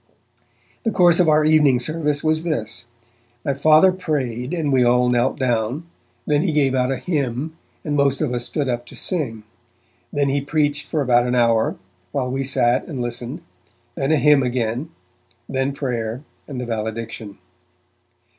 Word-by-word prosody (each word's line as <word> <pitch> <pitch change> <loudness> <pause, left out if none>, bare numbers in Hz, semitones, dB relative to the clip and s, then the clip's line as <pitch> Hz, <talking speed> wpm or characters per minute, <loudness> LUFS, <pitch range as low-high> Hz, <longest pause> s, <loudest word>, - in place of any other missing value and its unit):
The 225 - +1
course 175 -4 +4
of 175 -3 +4
our 155 0 +4
evening 150 -5 +4
service 150 +1 -1
was 155 0 +2
this: 115 -9 -3 0.6
My 140 - +1
Father 155 +6 +5
prayed, 135 -8 -3
and 160 -5 -1
we 130 -1 +4
all 125 +1 +3
knelt 125 +1 +1
down; 125 +3 -1 0.4
then 145 0 +2
he 170 -2 0
gave 140 -3 +2
out 130 0 +1
a 135 - -1
hymn 140 +1 -2 0.3
and 150 -2 -1
most 140 -1 +2
of 150 -6 -1
us 120 0 -2
stood 145 +2 -2
up 120 -1 -2
to - - -11
sing; 125 - -2 0.7
then 140 -1 +1
he 140 +1 +1
preached 145 0 0
for 155 - -1
about 120 -1 +3
an 125 - 0
hour, 115 -2 +2 0.4
while 130 -2 -1
we 135 +1 -1
sat 125 -2 +1
and 145 -6 -5
listened; 120 +5 -4 0.5
then 135 +2 -1
a 155 - +4
hymn 150 -1 +5
again; 125 +3 -2 0.6
then 135 +1 -1
prayer 125 -3 -3 0.2
and 135 -4 -6
the 125 - -3
valediction. 110 -2 -5
135 Hz, 165 wpm, -21 LUFS, 120-150 Hz, 0.7 s, Father